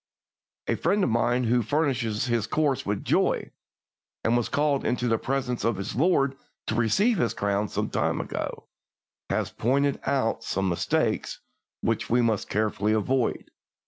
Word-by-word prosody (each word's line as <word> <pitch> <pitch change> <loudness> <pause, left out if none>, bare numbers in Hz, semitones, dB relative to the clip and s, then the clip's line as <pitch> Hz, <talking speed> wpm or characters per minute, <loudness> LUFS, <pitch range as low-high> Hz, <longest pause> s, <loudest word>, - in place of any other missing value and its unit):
A - - +2
friend 200 0 +1
of - - +1
mine 120 +2 +2
who 120 +1 +2
finished 135 +2 0 0.2
his 120 -4 0
course 145 -7 0
with 100 -1 -2
joy, - - +1 0.7
and 115 - +2
was 120 -2 0
called 145 -2 +1
into 125 0 0
the 115 -1 +2
presence 130 -2 -2
of 115 -1 +1
his 100 +2 -4
Lord 140 -2 +2 0.3
to - - -2
receive 185 - +2
his 120 - 0
crown 100 0 0
some - - -2
time - - 0
ago, - - -4 0.6
has - - -1
pointed 140 +4 +1
out 120 -5 0
some 95 -3 -1
mistakes 85 - -1 0.4
which - - -1
we 120 - +3
must 110 -3 0
carefully 105 0 0
avoid. 120 +3 0
120 Hz, 155 wpm, -26 LUFS, 110-135 Hz, 0.7 s, we